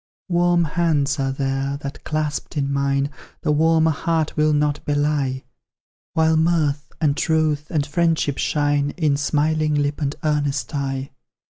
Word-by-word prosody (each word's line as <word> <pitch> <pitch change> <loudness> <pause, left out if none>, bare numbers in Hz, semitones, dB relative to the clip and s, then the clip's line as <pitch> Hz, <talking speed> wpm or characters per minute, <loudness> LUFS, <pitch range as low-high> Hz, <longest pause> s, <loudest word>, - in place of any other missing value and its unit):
Warm 175 0 +3
hands 150 -3 +1
are 135 0 0
there, 135 +1 -2
that, 140 0 -7
clasped 155 -1 -3
in 140 -1 0
mine, 140 0 0 0.3
The - - +1
warmer 160 +1 +3
heart 160 +1 -1
will 155 0 +3
not 150 -1 +1
belie; 145 -3 0 0.7
While 160 0 +3
mirth, 155 -3 +1
and 150 -3 +2
truth, 155 -2 0
and 150 -4 0
friendship 160 -2 0
shine 145 -1 +1
In 155 -5 +2
smiling 150 +1 +1
lip 145 +1 -1
and 145 0 -1
earnest 145 -4 -1
eye. 135 -1 -3
150 Hz, 140 wpm, -22 LUFS, 140-160 Hz, 0.7 s, Warm